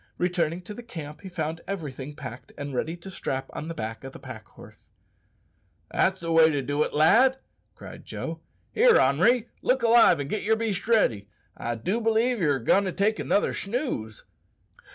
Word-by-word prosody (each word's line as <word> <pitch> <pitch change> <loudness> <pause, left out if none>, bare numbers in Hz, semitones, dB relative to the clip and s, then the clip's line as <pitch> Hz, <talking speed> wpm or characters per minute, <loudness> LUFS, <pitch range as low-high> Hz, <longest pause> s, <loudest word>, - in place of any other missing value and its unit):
Returning 175 -1 -1
to 210 - -8
the 240 - -8
camp 155 -10 -9
he 190 - -8
found 165 -2 -4
everything 150 -7 -5
packed 130 -4 -9
and 145 -1 -5
ready 160 +7 -2
to 190 +3 -10
strap 135 -7 -4
on 155 - -6
the 165 - -5
back 110 +2 -5
of 135 0 -8
the - - -10
pack - - -10
horse. - - -16 1.0
"That's 190 -1 +1
the 165 0 -3
way 165 -1 +6
to 145 -3 -1
do 145 +3 -1
it, - - +1
lad," 235 - +5 0.4
cried - - -11
Joe. - - -6 0.3
"Here, 475 +1 +5
Henri, 200 - +3
look 255 -1 +1
alive 230 -8 +6
and 140 - -3
git 215 +7 -2
yer 220 +2 +2
beast 220 -4 -3
ready. 115 - +2 0.3
I 120 0 -3
do 185 - -2
believe 225 +2 +2
ye're 150 -6 +2
goin' 195 - +2
to 185 - -1
take 210 +4 0
another 205 - +1
snooze!" 200 - -4
170 Hz, 185 wpm, -26 LUFS, 145-220 Hz, 1.0 s, way